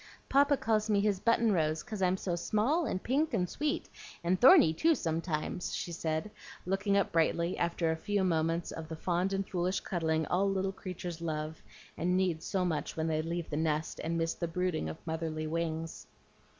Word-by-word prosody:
"Papa 280 +1 +4
calls 220 -2 +1
me 205 -1 +3
his 200 -2 +1
button 230 +1 +3
rose, 155 -3 +1
'cause 215 -5 -6
I'm 185 0 +2
so 180 -2 -2
small 245 - +1
and 185 - -2
pink 295 +6 +1
and 180 - +1
sweet, 295 - -2 0.4
and 180 +2 +1
thorny 255 - +8
too 325 - +3
sometimes," 165 - -2
she 175 - -4
said, 160 +4 -2 0.3
looking 195 +2 +1
up 200 - +1
brightly, 170 +1 +1
after 170 -1 +1
a - - 0
few 200 +4 -1
moments 165 -1 0
of 160 -1 -6
the 160 - -4
fond 180 +3 0
and 195 0 -1
foolish 185 +1 0
cuddling 160 -3 0
all 195 +5 +1
little 195 0 0
creatures 180 -3 -6
love 155 -1 -3 0.4
and 180 +2 +2
need 180 -4 +1
so 185 +2 -1
much 160 -3 -2
when 160 - 0
they 155 -1 +1
leave 170 +1 -3
the 150 - -1
nest, 155 0 -1
and 165 +1 -1
miss 165 0 0
the 170 - -3
brooding 170 - -1
of 80 - -6
motherly 160 -1 -3
wings. 165 0 -3
175 Hz, 190 wpm, -31 LUFS, 160-195 Hz, 0.4 s, thorny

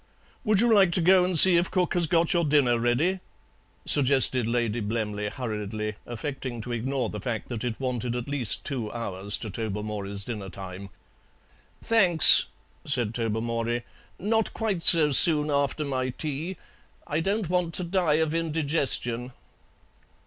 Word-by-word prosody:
"Would 215 -4 +1
you 235 -1 +2
like 195 -4 +3
to - - -1
go 185 +2 +4
and 180 -1 0
see 180 +2 +8
if 175 - 0
cook 180 -2 -1
has 175 -3 -1
got 165 +3 0
your 170 -1 0
dinner 140 -6 +1
ready?" 140 +11 -1 0.7
suggested 130 -3 +5
Lady 120 -1 -2
Blemley 105 -1 -4
hurriedly, 105 -3 -6
affecting 125 0 -7
to 120 - -8
ignore 130 +3 -3
the 105 - -7
fact 115 0 -5
that 120 -3 -6
it 120 -3 -5
wanted 125 -2 -4
at 125 +1 -6
least 140 -5 -1
two 120 -7 -5
hours 100 -3 -1
to 110 - -8
Tobermory's 105 -1 -5
dinner 105 -3 -7
time. 95 0 -10 0.9
"Thanks," 185 -8 +7 0.4
said 120 -6 -2
Tobermory, 115 +1 -3 0.3
"not 220 +2 -2
quite 210 -6 -3
so 160 -3 +4
soon 150 +1 +5
after 140 +1 -2
my 130 -2 -3
tea. 155 +7 -6 0.5
I 150 - -3
don't 195 +3 -2
want 175 -2 -2
to 180 - 0
die 175 -3 0
of 160 0 -1
indigestion." 145 -7 -2
130 Hz, 150 wpm, -25 LUFS, 115-165 Hz, 0.9 s, see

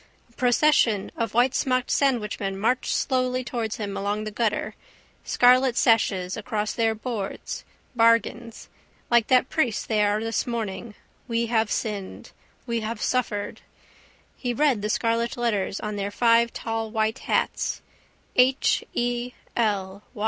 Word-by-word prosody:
A - - -27
procession 245 -4 +2
of 230 -1 -2
whitesmocked 255 +1 +1
sandwichmen 210 -7 0
marched 240 +5 0
slowly 255 -1 0
towards 230 -3 -3
him 205 -4 -5
along 205 +2 -2
the 215 - -5
gutter, 215 0 -1 0.5
scarlet 250 0 +4
sashes 195 -5 +2
across 215 -1 -3
their 225 -1 +1
boards. 220 -3 -5 0.3
Bargains. 230 0 +1 0.4
Like 235 -2 +4
that 255 0 +3
priest 255 -9 0
they 215 -2 +2
are 205 +1 +2
this 225 +1 -1
morning: 220 -2 -4 0.3
we 230 -1 0
have 220 -1 +2
sinned: 205 -4 -4 0.3
we 235 -2 -1
have 220 0 -4
suffered. 220 -5 -2 0.7
He 245 -2 -3
read 275 -6 +2
the 210 - -2
scarlet 230 +2 0
letters 210 -5 -1
on 210 -1 -4
their 200 0 -2
five 230 +2 +3
tall 225 -1 -3
white 220 0 -1
hats: - - -1 0.5
H. 255 +2 +3
E. 245 +1 -1 0.2
L. 200 -4 -1
230 Hz, 135 wpm, -25 LUFS, 210-245 Hz, 0.7 s, scarlet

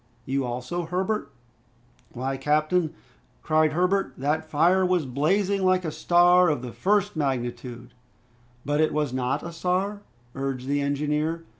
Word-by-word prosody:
"You 135 +1 -1
also, 125 +8 -4
Herbert?" 185 -3 -2 0.8
"Why, 130 +2 -3
captain," 155 +4 +1 0.5
cried 155 -1 +2
Herbert, 180 -2 +1
"that 155 +4 -1
fire 175 +5 +3
was 180 -4 +1
blazing 190 +9 +1
like 185 -1 +2
a 160 - -2
star 175 +2 +4
of 145 -5 -1
the 125 - -6
first 200 - +1
magnitude!" 120 -4 -3 0.7
"But 150 +2 +2
was 150 -3 -1
it - - -5
not 125 0 -1
a 170 - -6
star?" 185 +4 -1 0.3
urged 135 -2 -4
the 145 +1 +1
engineer. 150 +3 -1
155 Hz, 140 wpm, -25 LUFS, 135-180 Hz, 0.8 s, star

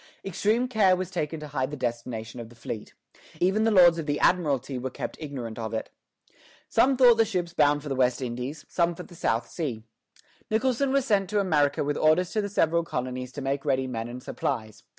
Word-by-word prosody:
Extreme 215 +6 +1
care 205 -6 +4
was 185 0 -4
taken 160 -3 -3
to 150 - -7
hide 130 -2 -1
the 150 - -6
destination 120 -2 -4
of 115 -1 -8
the 120 - -16
fleet. 115 -1 -7 0.4
Even 195 +5 +2
the - - +4
Lords 175 -5 +6
of 160 - -5
the 145 0 0
Admiralty 140 -7 +1
were 130 +2 -3
kept - - -6
ignorant 125 -7 -6
of 110 0 -3
it. 110 - -4 0.8
Some 265 0 +3
thought 245 -3 +7
the - - +7
ships 180 -6 -3
bound 145 -2 +3
for 150 - -6
the - - 0
West 125 -2 +2
Indies; 125 +4 -5
some 170 -1 +1
for 180 - -7
the - - -15
South 115 -9 -1
Sea. 130 -10 -4 0.7
Nicholson 260 +4 +1
was 275 -1 +2
sent 200 -6 +2
to 210 0 +1
America 150 -8 +2
with 145 0 -1
orders 160 +3 +3
to 215 - 0
the 205 - -3
several 170 -3 +2
colonies 125 -4 -4
to 145 - -6
make 135 +1 -1
ready 130 -2 +1
men 115 -3 -4
and 125 +1 -8
supplies. 110 -2 -3
150 Hz, 210 wpm, -27 LUFS, 125-185 Hz, 0.8 s, thought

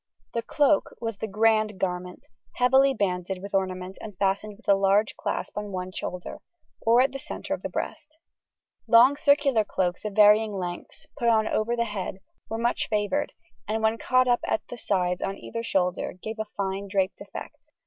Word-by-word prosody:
The 235 - 0
cloak 290 +5 +2
was 225 -3 -4
the 220 - -4
"grand 215 -1 +2
garment," 180 -1 -3 0.3
heavily 265 +2 +5
banded 190 -5 -2
with 200 +2 -9
ornament 185 -1 -2
and 210 -4 -9
fastened 200 +2 -1
with 235 - -23
a 200 - +7
large 195 +2 +2
clasp - - -4
on 210 -1 -4
one 185 0 -4
shoulder, 180 -1 -6 0.4
or 235 +2 +5
at 265 +1 +2
the 275 - -6
centre 290 - -5
of - - -4
the - - -4
breast. 310 - -5 0.7
Long 245 +4 +7
circular 285 -5 +3
cloaks 180 -3 -2
of 210 -1 -4
varying 210 +1 +5
lengths, 175 -2 -6
put 235 - 0
on 220 -2 +4
over 230 +2 0
the 235 0 0
head, 200 -3 -4 0.3
were 225 - -2
much 235 +1 0
favoured, 215 +7 -1 0.3
and 220 +1 -1
when 220 +1 +2
caught 255 0 +3
up 245 -1 +3
at - - -1
the - - -6
sides 180 -6 0
on 195 0 -2
either 230 - -5
shoulder 185 -5 0
gave 220 +3 -6
a 220 - -1
fine 195 0 -2
draped 195 -1 -1
effect. - - -10
210 Hz, 185 wpm, -26 LUFS, 190-235 Hz, 0.7 s, a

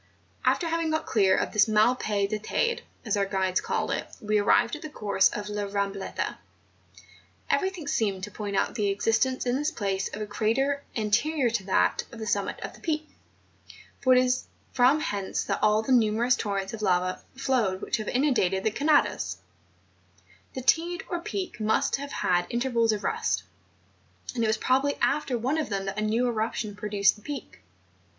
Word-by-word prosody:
After 345 - +2
having 330 0 0
got 315 0 -1
clear 195 -5 +3
of - - -1
this 215 0 +5
mal 215 +3 +4
pais 205 -4 0
del 215 +1 -2
Teyde, 470 - 0 0.2
as 220 - +1
our 200 -1 +1
guides 190 -2 0
call - - -1
it, - - -2
we 210 0 +1
arrived 230 +4 +3
at 300 - -9
the 310 - -6
course 200 -8 +2
of 210 0 -5
La 210 -1 -3
Mam 200 0 -1
bleta. 195 -1 -4 1.1
Everything 370 -6 0
seemed 200 -8 0
to 210 - -5
point 205 -2 -4
out - - +1
the 205 -3 0
exist¬ 225 +4 +2
ence 260 0 -4
in 245 0 +1
this 295 +2 0
place 195 - -2
of 205 - -6
a 215 - -2
crater 235 +7 0
anterior 240 +5 +1
to 225 -4 -1
that 190 - +2
of 235 - -10
the 220 - -5
summit 225 - -1
of - - -6
the - - -15
Peak; 310 -2 -2 0.9
for 255 - +5
it - - +6
is 255 0 0 0.3
from 265 +4 +4
hence 200 -6 -2
that - - -2
all 215 +1 +3
the 265 - -2
numerous 235 +1 +3
torrents 200 -3 -3
of 220 - -6
lava 185 -2 +1
flowed 245 -8 0
which - - 0
have 215 - -5
inundated 245 -9 +1
the 220 - +1
Canadas, 210 - +1 1.2
The 260 - -4
Teyde 345 +6 +2
or 350 - -2
Peak 365 -3 -5
must 215 +4 +1
have 285 +1 -7
had 175 0 +1
intervals 235 -2 +1
of 210 -1 -3
rest; 445 0 0 0.9
and 235 -2 -1
it - - +2
was 220 0 +2
probably 270 +5 +2
after 275 -4 0
one 265 +7 0
of 310 - -2
them 195 -1 -2
that 195 +2 -3
a - - -1
new 225 +4 +1
eruption 220 -2 -2
produced 205 -1 +2
the - - -17
Peak. 280 +1 -7
220 Hz, 190 wpm, -27 LUFS, 205-270 Hz, 1.2 s, it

